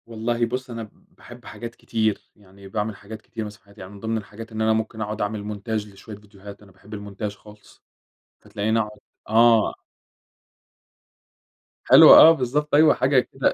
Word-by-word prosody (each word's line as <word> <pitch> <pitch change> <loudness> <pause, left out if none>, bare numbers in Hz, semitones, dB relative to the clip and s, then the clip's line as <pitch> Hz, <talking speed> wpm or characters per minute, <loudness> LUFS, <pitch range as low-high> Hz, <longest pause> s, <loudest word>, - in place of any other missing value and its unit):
والله 115 +1 -2
بُصّ، 125 +2 -5
أنا 115 -2 -7 0.3
باحب 120 -1 -15
حاجات 115 +2 -9
كتير، 110 -2 -3
يعني 100 -1 -17
باعمل 105 +2 -4
حاجات 110 +3 -11
كتير 110 0 -7
مثلًا 105 -1 -11
في - - -39
حياتي 100 0 -17
يعني 95 +2 -11
من 100 - -12
ضمن 115 +2 -3
الحاجات 110 +2 -10
إن 110 0 -5
أنا 110 0 +2
ممكن 110 0 -4
أقعد 105 0 -4
أعمل 105 0 -4
montage 105 0 -4
لشوية 105 +2 -12
فيديوهات، 100 0 -14
أنا 100 - -19
باحب 100 +3 -12 0.2
الmontage 105 0 -4
خالص، 105 0 -19 0.6
فتلاقيني 105 +2 -2
أقعد 105 -1 -5 0.3
آه. 115 0 +4 2.1
حلوة - - +8
آه، 160 - +9
بالضبط 150 +1 -1
أيوه 155 +1 +6
حاجة 135 0 +2
كده 135 +1 -1
110 Hz, 170 wpm, -22 LUFS, 105-115 Hz, 2.1 s, آه